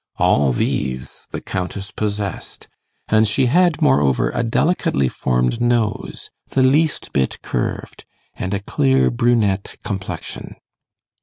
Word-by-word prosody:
All 70 -2 +3
these 65 +1 -2
the - - -5
Countess 95 +2 -4
possessed, 105 -1 -4 0.4
and 110 0 +4
she 130 +6 +2
had, 175 +5 +3
moreover, 70 -1 +3
a - - -1
delicately 115 - +1
formed 60 - 0
nose, 120 -3 -1 0.2
the 130 - +2
least 150 +4 +2
bit 65 -1 0
curved, - - -4 0.3
and 95 - -4
a 100 - -3
clear 135 +3 +2
brunette 115 -5 +1
complexion. 95 -2 -6
105 Hz, 120 wpm, -20 LUFS, 80-125 Hz, 0.4 s, and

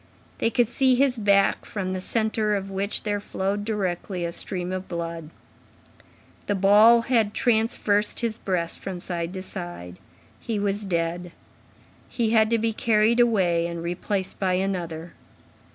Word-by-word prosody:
They - - +2
could 235 0 +2
see 260 +2 +2
his 255 -2 +2
back, 200 -2 +3
from 185 -3 -4
the 185 - -3
centre 215 0 0
of 195 0 -4
which 195 +2 -1
there 205 -1 -1
flowed 200 +1 -2
directly 190 -4 -2
a 170 - -3
stream 180 0 -5
of 185 0 -4
blood. 165 -2 -5 1.2
The 205 - +1
ball 210 +5 +6
had 225 -4 +1
traversed 220 -2 +1
his 230 -1 -2
breast 175 -3 -2
from 185 -2 -6
side 175 -2 -4
to 185 - -5
side. 175 - -8 0.4
He 225 -3 -3
was 205 0 -1
dead. 170 0 -2 0.8
He 230 -3 0
had 220 -1 +4
to 230 - +2
be 225 0 0
carried 220 +1 +2
away 185 -8 +3
and 170 -1 -5
replaced 185 +3 -3
by 185 -2 +1
another. 175 -3 -3
195 Hz, 150 wpm, -25 LUFS, 175-220 Hz, 1.2 s, ball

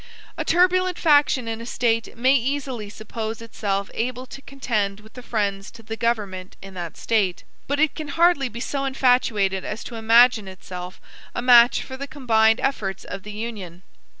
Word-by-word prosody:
A - - -3
turbulent 365 +1 +3
faction 290 -6 +3
in 225 0 -4
a - - -7
State 230 -2 -1
may 260 +3 +4
easily 260 -4 -2
suppose 220 +1 -6
itself 200 -3 -3
able 250 +2 -3
to 270 - -11
contend 215 -8 -2
with 220 +1 -17
the 250 - -10
friends 200 -5 -2
to 230 -1 -14
the 225 +1 -5
government 205 -6 -2
in 195 0 -11
that 175 -3 -7
State; 205 -6 0 0.2
but 285 +1 -1
it 310 -1 +3
can 310 -2 -6
hardly 325 -3 +3
be 235 - -8
so 275 +2 -3
infatuated 245 -8 +1
as 210 - -5
to - - -9
imagine 225 -1 +5
itself 180 -1 -8 0.4
a - - -1
match 245 -1 +6
for 260 - -8
the 280 +1 -6
combined 225 -6 +2
efforts 205 -8 -2
of 195 +1 -7
the 210 - -9
Union. 205 -5 -7
230 Hz, 175 wpm, -23 LUFS, 205-265 Hz, 0.4 s, match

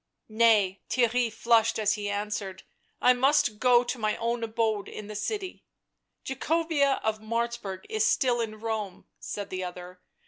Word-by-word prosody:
" - - -57
Nay," 215 -4 +3
— - - -47
Theirry 240 -1 +2
flushed 230 0 +2
as 215 -1 +2
he 205 -1 -3
answered 205 -2 -4
— - - -43
" - - -44
I 250 - +7
must 250 -4 +2
go 245 -1 +5
to 245 0 -4
my 215 -1 0
own 235 0 -2
abode 220 -2 -1
in 215 - -8
the 210 +1 -8
city." 380 - -4 0.3
" - - -53
Jacobea 290 0 +1
of 220 0 0
Martzburg 230 -3 -3
is 215 0 0
still 240 +1 +2
in 215 -1 -5
Rome," 215 -4 -4
said 205 -1 -6
the 185 0 -3
other. 180 0 -8
220 Hz, 180 wpm, -27 LUFS, 210-240 Hz, 0.3 s, I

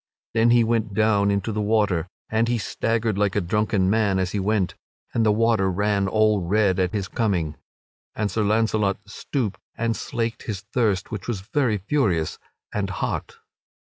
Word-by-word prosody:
Then 115 +1 +4
he 120 0 +5
went 110 -3 0
down 105 -2 +3
into 100 +2 0
the 105 0 -1
water, 105 -6 +1 0.2
and 110 +1 +1
he 120 0 +1
staggered 115 -1 -1
like 100 -2 +1
a - - +3
drunken 100 +1 +1
man 100 -1 +2
as 95 -1 0
he 105 - -1
went, 100 -1 0 0.4
and 115 - +2
the 110 - +4
water 110 -3 +2
ran 100 +1 +1
all 110 0 +3
red 95 +1 +2
at 90 -1 +1
his 100 -3 -2
coming. 90 -10 -1 0.6
And 105 -2 -1
Sir 110 - 0
Launcelot 105 -1 +2
stooped 115 -8 -3 0.2
and 115 -1 0
slaked 115 0 -3
his 100 -4 -3
thirst, 105 -7 0
which 105 -4 -5
was 110 -6 -2
very 115 +1 0
furious 95 - 0 0.3
and - - -1
hot. - - -3
105 Hz, 170 wpm, -24 LUFS, 95-115 Hz, 0.6 s, he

